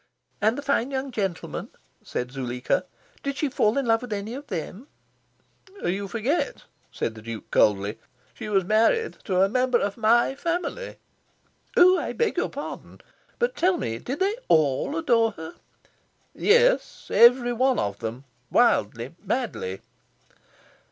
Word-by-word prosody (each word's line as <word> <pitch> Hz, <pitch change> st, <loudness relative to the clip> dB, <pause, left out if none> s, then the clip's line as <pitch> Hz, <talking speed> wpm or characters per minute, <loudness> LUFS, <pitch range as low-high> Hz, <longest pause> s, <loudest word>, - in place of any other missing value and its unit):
"And 220 Hz, +3 st, +2 dB
the 285 Hz, -, -5 dB
fine 275 Hz, -3 st, +1 dB
young 270 Hz, 0 st, -3 dB
gentlemen," 195 Hz, -7 st, -3 dB, 0.3 s
said 125 Hz, 0 st, -4 dB
Zuleika, 125 Hz, -2 st, -2 dB, 0.4 s
"did 280 Hz, 0 st, -3 dB
she 300 Hz, -, 0 dB
fall 225 Hz, -3 st, +1 dB
in 275 Hz, -, +1 dB
love 225 Hz, -1 st, +3 dB
with 250 Hz, -2 st, -8 dB
any 210 Hz, +2 st, -3 dB
of 280 Hz, +3 st, -8 dB
them?" 190 Hz, -, -6 dB, 1.0 s
"You 195 Hz, +3 st, -1 dB
forget," 235 Hz, -, -1 dB, 0.3 s
said 115 Hz, -, -3 dB
the 110 Hz, -, -11 dB
Duke 115 Hz, 0 st, -8 dB
coldly, 100 Hz, 0 st, +2 dB, 0.3 s
"she -, -, -7 dB
was 195 Hz, -3 st, +2 dB
married 225 Hz, -, +2 dB
to 185 Hz, -2 st, +2 dB
a -, -, +4 dB
member 250 Hz, +3 st, +2 dB
of 200 Hz, +2 st, -2 dB
my 235 Hz, +3 st, +3 dB
family." 350 Hz, -, -3 dB, 0.8 s
"Oh, 365 Hz, +1 st, +7 dB
I -, -, -3 dB
beg 470 Hz, -, 0 dB
your -, -, 0 dB
pardon. -, -, -8 dB, 0.4 s
But 485 Hz, +1 st, 0 dB
tell 360 Hz, +1 st, +2 dB
me: 115 Hz, -, -3 dB
did 270 Hz, +8 st, -5 dB
they 400 Hz, +3 st, +2 dB
ALL 155 Hz, -, +2 dB
adore 230 Hz, -8 st, +2 dB
her?" 160 Hz, -2 st, -8 dB, 0.8 s
"Yes. 485 Hz, +3 st, +2 dB
Every 245 Hz, +1 st, +6 dB
one 255 Hz, +2 st, +2 dB
of 100 Hz, 0 st, -2 dB
them, 115 Hz, +3 st, -5 dB, 0.3 s
wildly, 120 Hz, -, +2 dB
madly." 210 Hz, -, -3 dB
230 Hz, 145 wpm, -25 LUFS, -, 1.0 s, Oh